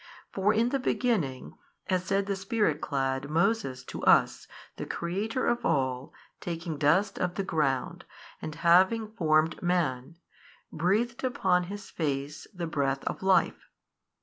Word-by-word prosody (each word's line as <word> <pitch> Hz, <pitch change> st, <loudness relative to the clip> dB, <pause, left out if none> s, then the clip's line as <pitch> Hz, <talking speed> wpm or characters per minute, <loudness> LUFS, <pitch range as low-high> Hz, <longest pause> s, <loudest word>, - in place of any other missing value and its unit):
For 195 Hz, +2 st, +2 dB
in 225 Hz, +3 st, +2 dB
the 275 Hz, +1 st, 0 dB
beginning, 210 Hz, -, -1 dB, 0.3 s
as 185 Hz, -2 st, 0 dB
said 195 Hz, +1 st, +1 dB
the 200 Hz, 0 st, -1 dB
Spirit 195 Hz, -3 st, 0 dB
clad, 135 Hz, 0 st, -2 dB
Moses, 160 Hz, -, 0 dB
to -, -, -8 dB
us, -, -, +3 dB, 0.3 s
the -, -, -5 dB
Creator 205 Hz, +9 st, -2 dB
of 240 Hz, 0 st, 0 dB
all, 130 Hz, -, 0 dB, 0.3 s
taking 165 Hz, -3 st, -5 dB
dust 160 Hz, +8 st, +2 dB
of 180 Hz, -1 st, -1 dB
the 195 Hz, -, -1 dB
ground 150 Hz, -9 st, -1 dB, 0.4 s
and 155 Hz, -, -6 dB
having 190 Hz, +6 st, +4 dB
formed 160 Hz, -5 st, +1 dB
man, 165 Hz, -5 st, -1 dB, 0.6 s
breathed 215 Hz, +10 st, 0 dB
upon 185 Hz, -8 st, +1 dB
his 205 Hz, +3 st, -8 dB
face 145 Hz, -2 st, -3 dB
the 180 Hz, -4 st, -5 dB
breath 135 Hz, -4 st, -1 dB
of -, -, -4 dB
life. 190 Hz, 0 st, +2 dB
175 Hz, 140 wpm, -28 LUFS, 145-205 Hz, 0.6 s, having